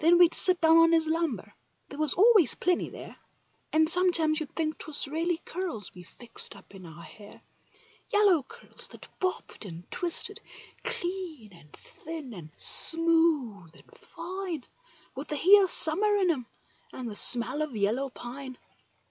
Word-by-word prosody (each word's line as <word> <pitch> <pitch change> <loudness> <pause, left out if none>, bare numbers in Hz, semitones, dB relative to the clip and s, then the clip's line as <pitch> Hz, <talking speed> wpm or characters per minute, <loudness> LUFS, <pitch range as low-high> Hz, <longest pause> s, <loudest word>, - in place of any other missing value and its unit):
we'd 345 +1 +4
sit 365 -1 +2
down 325 0 +4
on 330 0 +4
his 325 -1 +1
lumber—there 290 - -7
was 310 -3 +2
always 410 - +3
plenty 360 -1 -2
there, - - -12 0.6
And 315 0 +1
sometimes 335 -3 +1
you'd 310 -3 -8
think 315 -1 -4
'twas 295 -2 -2
really 330 +4 -3
curls 340 - -6
we 180 - -13
fixed 230 +7 -4
up - - -19
in 185 -3 -13
our 165 +1 -14
hair— 205 +5 -16 0.7
Yellow 405 -6 +2
curls 465 - -11
that - - -15
bobbed 370 -9 -5
and 170 -4 -11
twisted, 345 -2 -3 0.4
clean 360 - -6
and 150 -4 -20
thin 310 -6 -11
and 170 -6 -12
smooth 320 - +5
and - - -21
fine, 345 -3 -8 0.5
th 275 +3 -9
the 300 - -5
heat 390 +8 +5
of 380 - -1
summer 410 +8 +3
in 375 -4 +1
'em 255 -7 -6 0.4
and 255 -2 -9
the 215 - -8
smell 245 +7 +4
of 300 -6 -5
yellow 220 +7 -2
pine. 255 +1 -10
315 Hz, 155 wpm, -26 LUFS, 240-350 Hz, 0.7 s, smooth